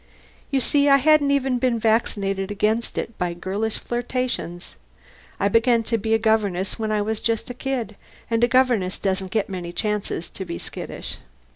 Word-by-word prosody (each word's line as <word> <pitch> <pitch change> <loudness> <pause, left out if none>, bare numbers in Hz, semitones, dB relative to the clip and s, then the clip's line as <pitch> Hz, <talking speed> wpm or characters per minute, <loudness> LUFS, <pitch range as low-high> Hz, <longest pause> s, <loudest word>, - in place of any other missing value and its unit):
_ - - -31 0.5
You 275 - +2
see 285 +2 +3
I 275 - +8
hadn't 295 +1 +4
even 270 -3 +1
been 250 -2 +2
vaccinated 205 -3 0
against 215 +3 0
it 230 - -3
by 175 -1 -1
girlish 200 +5 -2
flirtations. 240 -7 -3 0.6
I 200 - +3
began 230 +2 +3
to 230 +1 0
be 220 +2 +1
a - - +4
governess 210 -4 0
when 220 -1 -1
I 210 -1 +1
was 220 +1 -2
just 230 +1 -1
a - - -5
kid, 245 -4 -3 0.3
and 230 0 +1
a - - +6
governess 240 -7 +2
doesn't 190 -1 -1
get 210 +1 0
many 180 -3 -5
chances 210 -3 -2
to 190 - -6
be 170 -2 -5
skittish. - - -6
220 Hz, 180 wpm, -23 LUFS, 195-245 Hz, 0.6 s, I